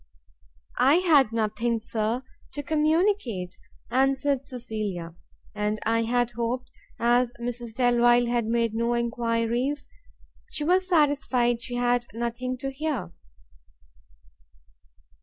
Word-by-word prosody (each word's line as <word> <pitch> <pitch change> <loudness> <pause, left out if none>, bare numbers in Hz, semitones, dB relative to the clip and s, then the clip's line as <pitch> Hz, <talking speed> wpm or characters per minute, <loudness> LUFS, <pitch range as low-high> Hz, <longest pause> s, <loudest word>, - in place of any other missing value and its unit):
"I 275 +4 +6
had 310 -10 +4
nothing, 230 +1 0
Sir, 220 +3 -2 0.3
to 290 - -4
communicate," 305 - +1 0.4
answered 270 +1 +1
Cecilia, 215 -9 -5 0.4
"and 210 0 -1
I 230 +1 +2
had 240 0 +1
hoped, 240 +2 -3 0.3
as 240 +1 +2
Mrs 235 -1 -5
Delvile 240 -1 +4 0.2
made 230 0 0
no 235 +1 0
enquiries, 235 +3 -1 0.6
she 300 - -3
was 370 +4 +2
satisfied 275 -8 +2
she 245 +1 -5
had 245 0 +1
nothing 240 +2 -3
to 270 +2 -4
hear." 270 - -3
240 Hz, 100 wpm, -26 LUFS, 230-270 Hz, 0.6 s, I